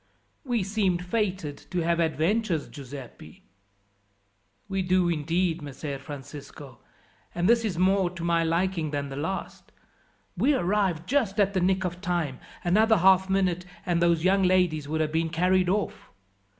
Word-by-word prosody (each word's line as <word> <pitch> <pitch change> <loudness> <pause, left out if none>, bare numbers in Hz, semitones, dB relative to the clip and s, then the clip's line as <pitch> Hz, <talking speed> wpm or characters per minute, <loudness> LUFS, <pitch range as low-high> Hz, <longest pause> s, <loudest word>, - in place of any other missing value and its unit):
"We 240 -7 0
seem 195 -2 +1
fated 180 -5 -2
to 180 -2 -1
have 170 +1 +1
adventures, 165 +3 0
Giuseppi." 130 - -11 1.2
"We 195 -1 -1
do 185 -1 +2
indeed, 165 +2 0
Messer 140 0 -6
Francisco, 140 -1 -10 0.6
and 175 +1 +1
this 235 +1 +4
is 200 -7 -2
more 190 0 +3
to 175 -1 -8
my 170 -1 +2
liking 165 0 0
than 145 -1 -3
the 135 - -6
last. 160 +7 -5 0.6
We 290 +1 +3
arrived 185 -6 0
just 230 -6 0
at 200 -1 +3
the 185 - +1
nick 190 +1 +2
of 180 0 -4
time; 170 -8 -2 0.2
another 220 +5 +4
half 190 +1 +4
minute 185 -2 +1 0.2
and 175 -2 +1
those 170 -1 +3
young 195 +2 +3
ladies 180 -5 +2
would 160 +1 -1
have 155 -1 -1
been 165 +1 0
carried 180 +2 +2
off. 205 +1 -2
175 Hz, 150 wpm, -26 LUFS, 160-190 Hz, 1.2 s, this